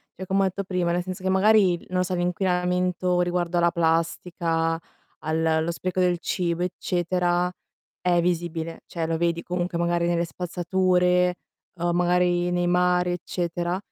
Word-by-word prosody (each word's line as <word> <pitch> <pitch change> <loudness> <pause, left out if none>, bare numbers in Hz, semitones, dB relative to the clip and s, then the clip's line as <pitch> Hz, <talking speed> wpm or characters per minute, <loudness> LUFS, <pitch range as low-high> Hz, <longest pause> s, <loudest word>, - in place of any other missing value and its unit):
Cioè, 190 - -7
comma 195 +1 +1
ha - - +3
etto: 190 +2 -4
nel 180 -1 0
senso 185 0 -6
che 190 - 0
magari, 190 -1 +4
non 185 0 0
lo - - +3
so, 185 0 -3
l' - - -2
inquinamento 180 0 0
riguardo 175 0 0
alla 170 0 +3
plastica, 165 0 0 0.4
al 160 +1 -1
allo 160 +1 +1
spreco 185 +1 -3
del 180 -1 +2
cibo, 175 -2 -1
eccetera, 180 0 0 0.5
è 175 -1 +2
visibile, 165 -1 -2
cioè 165 -1 -3
lo 165 0 0
vedi 170 0 0
comunque 175 0 -2
magari 170 0 +1
nelle 170 0 +1
spazzature 180 +1 +1 0.4
o 175 +1 +1
magari 175 0 +2
nei 175 0 +1
mari, 180 0 +2
eccetera; 175 0 -2
175 Hz, 155 wpm, -25 LUFS, 170-180 Hz, 0.5 s, magari